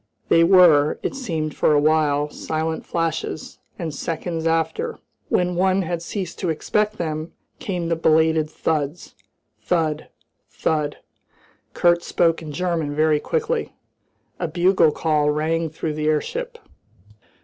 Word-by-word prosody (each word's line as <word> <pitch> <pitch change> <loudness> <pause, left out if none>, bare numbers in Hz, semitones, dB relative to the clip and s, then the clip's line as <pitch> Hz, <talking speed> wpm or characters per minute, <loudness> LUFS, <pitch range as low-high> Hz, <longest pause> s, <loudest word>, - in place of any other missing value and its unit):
They 165 - +5
were, 165 -5 +6
it - - -2
seemed 165 - -3
for - - +3
a 145 - +5
while, 150 -1 +2
silent 160 0 -3
flashes, 165 -2 -3 0.2
and 165 -4 -4
seconds 165 +2 -3
after, 165 0 -1 0.3
when 180 0 +1
one 190 +1 +2
had 170 0 -3
ceased 180 0 -5
to 180 - -1
expect 210 +7 0
them, 155 -1 -4 0.3
came 180 -4 -3
the 165 - +1
belated 160 -1 +3
thuds 155 0 -2 0.5
thud, 160 -3 -1 0.4
thud. 150 -2 -1 0.8
Kurt 175 0 +3
spoke 165 -1 +1
in 155 -2 -7
German, 165 -2 -2
very 155 0 +3
quickly. 460 - -2 0.7
A 170 - -1
bugle 175 0 +3
call 150 -1 +1
rang 160 +2 0
through 155 0 -4
the 150 0 -2
airship. 155 -1 -1
160 Hz, 130 wpm, -22 LUFS, 155-175 Hz, 0.8 s, were